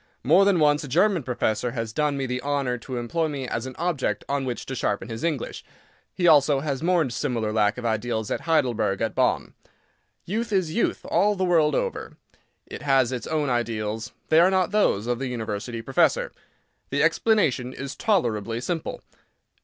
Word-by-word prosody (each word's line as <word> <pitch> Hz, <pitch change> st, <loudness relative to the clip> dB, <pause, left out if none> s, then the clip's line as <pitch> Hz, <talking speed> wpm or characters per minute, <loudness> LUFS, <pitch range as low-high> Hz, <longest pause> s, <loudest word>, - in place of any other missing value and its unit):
More 195 Hz, -, +5 dB
than 200 Hz, -2 st, +4 dB
once 150 Hz, -1 st, +3 dB
a -, -, -6 dB
German 180 Hz, +6 st, +2 dB
professor 120 Hz, -2 st, -1 dB
has 115 Hz, -3 st, -4 dB
done 150 Hz, 0 st, 0 dB
me 135 Hz, -, -1 dB
the 125 Hz, 0 st, -3 dB
honour 140 Hz, -4 st, -1 dB
to 125 Hz, +1 st, -6 dB
employ 160 Hz, +8 st, -1 dB
me 140 Hz, -4 st, -4 dB
as 115 Hz, +2 st, -3 dB
an 130 Hz, -, -8 dB
object 170 Hz, -5 st, -1 dB
on 140 Hz, -1 st, -1 dB
which 125 Hz, -2 st, -4 dB
to 135 Hz, -, -5 dB
sharpen 110 Hz, -3 st, -2 dB
his 115 Hz, 0 st, -6 dB
English. 155 Hz, -7 st, -2 dB, 0.5 s
He 175 Hz, -, +2 dB
also 145 Hz, -3 st, +5 dB
has 140 Hz, -2 st, -3 dB
mourned 165 Hz, -7 st, +1 dB
similar 120 Hz, -4 st, -2 dB
lack 105 Hz, 0 st, +2 dB
of 125 Hz, -, -6 dB
ideals 110 Hz, -1 st, -1 dB
at -, -, -1 dB
Heidelberg, 130 Hz, -11 st, +1 dB
at 115 Hz, -1 st, -1 dB
Bonn. -, -, 0 dB, 0.7 s
Youth 225 Hz, +5 st, -2 dB
is 185 Hz, -6 st, 0 dB
youth 235 Hz, -, -1 dB
all 210 Hz, +1 st, +2 dB
the 190 Hz, -1 st, 0 dB
world 165 Hz, -4 st, +3 dB
over; 485 Hz, -1 st, -3 dB, 0.5 s
it -, -, -9 dB
has 135 Hz, -3 st, +3 dB
its 125 Hz, -2 st, -4 dB
own 150 Hz, -4 st, 0 dB
ideals; 115 Hz, -1 st, -2 dB, 0.2 s
they 160 Hz, -, +6 dB
are 175 Hz, +2 st, +6 dB
not 190 Hz, -2 st, +1 dB
those 200 Hz, -, +2 dB
of 120 Hz, 0 st, -1 dB
the 135 Hz, -, -2 dB
University 115 Hz, -1 st, -4 dB
professor. 325 Hz, -, +2 dB, 0.6 s
The -, -, +1 dB
explanation 145 Hz, -, +2 dB
is 135 Hz, +1 st, -6 dB
tolerably 115 Hz, -, 0 dB
simple. 165 Hz, +5 st, -4 dB
135 Hz, 185 wpm, -25 LUFS, 120-165 Hz, 0.7 s, they